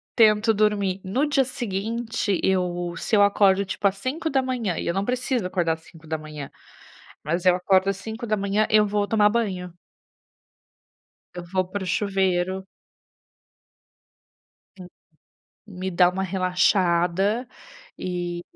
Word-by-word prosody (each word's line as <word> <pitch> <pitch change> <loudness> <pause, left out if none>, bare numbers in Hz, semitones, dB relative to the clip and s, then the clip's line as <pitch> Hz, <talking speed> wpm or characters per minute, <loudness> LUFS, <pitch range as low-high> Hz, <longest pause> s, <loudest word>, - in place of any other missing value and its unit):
Tento 220 -1 +5
dormir, 200 -3 +1
no 240 +10 0
dia 275 -3 +2
seguinte, 225 -3 -2
eu 175 -2 0
se 215 - 0
eu 205 - +6
acordo 200 -1 +4
tipo 200 +1 0
às 195 - -2
5h, 255 - -1
e - - -3
eu 170 - +1
não 195 +1 -1
preciso 250 -3 -1
acordar 175 -3 0
às 160 - -9
5h, 155 -3 -7 0.7
mas 170 +5 -2
eu 180 - +6
acordo 190 +1 +2
às 195 - 0
5h, 215 -1 -1
eu 215 -1 +5
vou 205 0 0
tomar 210 -2 +4
banho. 190 -6 -2 1.6
Eu 175 - -6
vou 185 -1 +1
para 195 0 -4
o - - -6
chuveiro. 190 -1 0 2.1
Sim, 185 - -10 0.8
me 190 -1 -5
dá 175 0 +5
uma 190 +1 -3
relaxada, 185 +3 +1 0.5
e 175 -1 -4
195 Hz, 125 wpm, -24 LUFS, 180-215 Hz, 2.1 s, eu